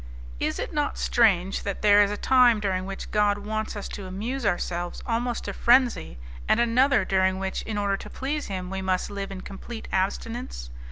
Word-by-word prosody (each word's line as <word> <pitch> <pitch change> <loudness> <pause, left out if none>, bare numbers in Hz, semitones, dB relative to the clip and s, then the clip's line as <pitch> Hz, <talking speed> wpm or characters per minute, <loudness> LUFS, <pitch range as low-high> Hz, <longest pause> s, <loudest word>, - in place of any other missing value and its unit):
Is - - -1
it - - -4
not - - -1
strange 175 - +2
that 200 0 -4
there 205 0 +7
is 205 - +3
a 205 - -3
time 250 -3 +5
during 190 -2 -1
which 195 - -7
God 205 -1 +3
wants 215 +1 -4
us 205 - -5
to 195 -2 -7
amuse 225 +6 -3
ourselves 175 -2 -2
almost 240 0 -1
to - - -4
frenzy, 245 - +3 0.3
and - - +4
another 240 -1 +3
during 190 0 +2
which, 190 0 -3
in 220 -2 -4
order 200 -1 0
to - - -9
please 290 +2 -3
Him, 185 -2 -5
we 190 0 -3
must 185 +1 -1
live 200 -1 -4
in 190 -1 -6
complete 220 +4 -8
abstinence? 195 - -3
205 Hz, 190 wpm, -26 LUFS, 190-230 Hz, 0.3 s, there